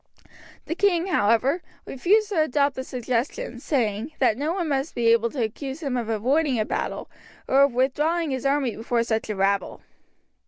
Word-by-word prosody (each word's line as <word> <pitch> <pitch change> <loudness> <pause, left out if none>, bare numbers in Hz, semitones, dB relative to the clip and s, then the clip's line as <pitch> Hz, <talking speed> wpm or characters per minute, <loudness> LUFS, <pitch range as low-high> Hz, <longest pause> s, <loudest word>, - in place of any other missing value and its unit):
The - - -2
king, 350 -2 +2
however, 265 - +2 0.2
refused 410 +10 +2
to 365 -7 +1
adopt 285 -2 +1
the 260 - -4
suggestion, 255 - -3
saying, 235 0 -1
that 250 -5 +3
no 290 +6 -2
one 350 -2 -2
must 280 +1 -2
be 230 -1 +2
able 230 0 +3
to 250 -1 -2
accuse 265 +7 -5
him 275 -3 -1
of 235 -2 -2
avoiding 255 +4 +1
a 215 - +1
battle - - -3 0.4
or 270 +1 +4
of 280 -2 +4
withdrawing 300 +5 +1
his 260 -1 -3
army 275 -3 +1
before 230 +1 0
such 220 -1 -2
a 210 - -2
rabble. 195 0 0
265 Hz, 180 wpm, -24 LUFS, 230-310 Hz, 0.4 s, or